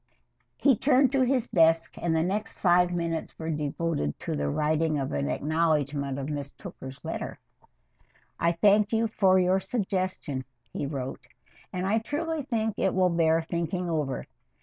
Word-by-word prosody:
He 275 -3 +4
turned 265 +2 +3
to 270 -1 +2
his 255 -1 +2
desk, 165 -1 +3
and 165 -2 0
the 160 - +2
next 200 +5 -2
five 180 -1 +4
minutes 170 -2 -3
were 160 0 -3
devoted 150 - -2
to - - -3
the 70 0 -1
writing 155 - +1
of 135 -2 -2
an 70 0 -1
acknowledgment 145 - 0
of 140 0 -4
Miss 145 -2 -4
Tooker's 130 -1 -10
letter. - - -4 1.0
I 170 +1 +2
thank 205 +4 +4
you 225 0 +2
for 190 -4 +3
your 185 +1 +3
suggestion 185 - -2 0.3
[he 140 - -2
wrote], 135 -2 -5 0.4
and 185 0 -2
I 215 +4 +2
truly 310 +6 -2
think 225 -5 -2
it 190 - +1
will 185 -1 +3
bear 165 -1 +3
thinking 170 +1 -2
over. 145 -5 -2
170 Hz, 160 wpm, -27 LUFS, 150-200 Hz, 1.0 s, He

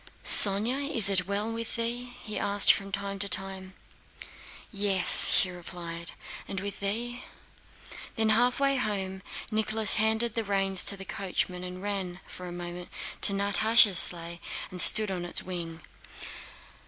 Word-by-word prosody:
"Sónya, 235 +8 +7
is 225 -9 +6
it 185 -2 +1
well 205 +3 -3
with 230 0 -6
thee?" 240 +1 -4
he 215 - -6
asked 200 0 +4
from 195 0 -7
time 200 0 -5
to 200 +1 -2
time. 190 -1 -3 1.0
"Yes!" 200 -3 0
she 185 - +2
replied. 170 -1 -7 0.3
"And 195 - -5
with 200 0 -8
thee?" 235 +5 -4 0.9
When 220 -3 0
halfway 250 +5 +1
home 190 -5 -4 0.3
Nicholas 215 -1 +3
handed 220 +1 0
the 230 - -3
reins 195 -2 0
to 200 - -1
the 195 - -9
coachman 180 -2 -4
and 180 +1 -9
ran 190 -3 -5
for 180 - -10
a - - -9
moment 175 0 -9 0.3
to 200 - +5
Natásha's 200 0 +2
sleigh 170 0 -2 0.3
and 180 -1 -3
stood 215 -3 +6
on 180 -2 -5
its 175 - -2
wing. 170 -3 -7
200 Hz, 145 wpm, -26 LUFS, 185-220 Hz, 1.0 s, Sónya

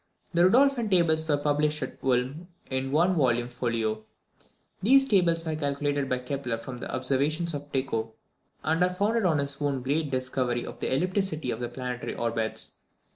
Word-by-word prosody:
The 175 +1 +5
Rudolphine 250 -1 +4
Tables 160 -4 +3
were 145 -2 +3
published 150 0 0
at 130 - -7
Ulm 130 +6 0 0.2
in 130 0 -1
one 170 +6 +3
volume 120 -6 +1
folio. 115 -3 -2 0.8
These 270 +6 +6
Tables 175 -8 +2
were 160 -1 -1
calculated 145 -1 -1
by 125 - +1
Kepler 125 -2 -3
from 120 +2 -8
the - - -6
Observations 140 +6 0
of 145 0 -6
Tycho, 115 -5 -1 0.5
and 160 +2 +1
are 180 - +4
founded 205 +4 +1
on 165 -4 +3
his 140 0 -3
own 140 -3 -1
great 145 +3 0
discovery 130 -2 -1
of - - -9
the - - -2
ellipticity 165 -2 0
of 110 - -6
the 120 -1 -3
planetary 125 0 -5
orbits. 115 -1 -1
145 Hz, 170 wpm, -27 LUFS, 125-165 Hz, 0.8 s, These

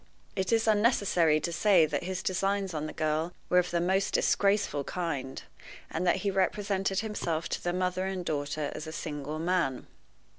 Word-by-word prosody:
It 190 +2 -1
is 225 -1 +2
unnecessary 200 -8 +3
to 170 - -2
say 180 -2 +5
that 150 +2 -3
his 185 0 -3
designs 195 0 0
on 155 0 -3
the - - -5
girl 155 +2 -1 0.2
were 180 - +5
of 180 0 0
the 170 - 0
most 190 +3 +1
disgraceful 200 -8 +2
kind, 140 -6 -4 0.5
and 180 +3 -1
that - - +4
he 200 - +2
represented 195 0 0
himself 170 -7 -2
to - - -3
the 175 - 0
mother 185 +1 -1
and 185 -2 -3
daughter 145 -1 -2
as 155 - -6
a - - -5
single 150 -1 -4
man. 170 -5 0
180 Hz, 180 wpm, -29 LUFS, 155-195 Hz, 0.5 s, say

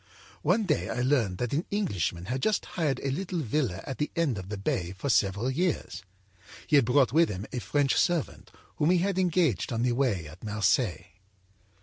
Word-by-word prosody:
âOne 200 +8 +2
day 155 -6 0
I 125 - -1
learned 120 -9 +1
that 125 +4 -2
an 155 +5 -1
Englishman 95 - -1
had 130 +5 -3
just 215 +4 +1
hired 150 -7 0
a 135 - 0
little 175 +3 -2
villa 120 - -1
at 135 -4 -6
the 150 - 0
end 145 -11 0
of 95 0 -9
the 105 - -4
bay 90 -2 -2
for 140 - -3
several 100 +4 +1
years. 150 - -1 0.6
He 150 - +2
had 140 -4 +6
brought 125 0 +3
with 165 +1 +4
him 95 0 -5
a 125 - -1
French 140 +2 +1
servant, 175 -4 0 0.3
whom 150 - +2
he 180 - +5
had 190 +1 0
engaged 170 - +1
on 115 0 -1
the 125 - +2
way 120 - 0
at 75 - -13
Marseilles. 105 - +1
130 Hz, 200 wpm, -28 LUFS, 105-160 Hz, 0.6 s, had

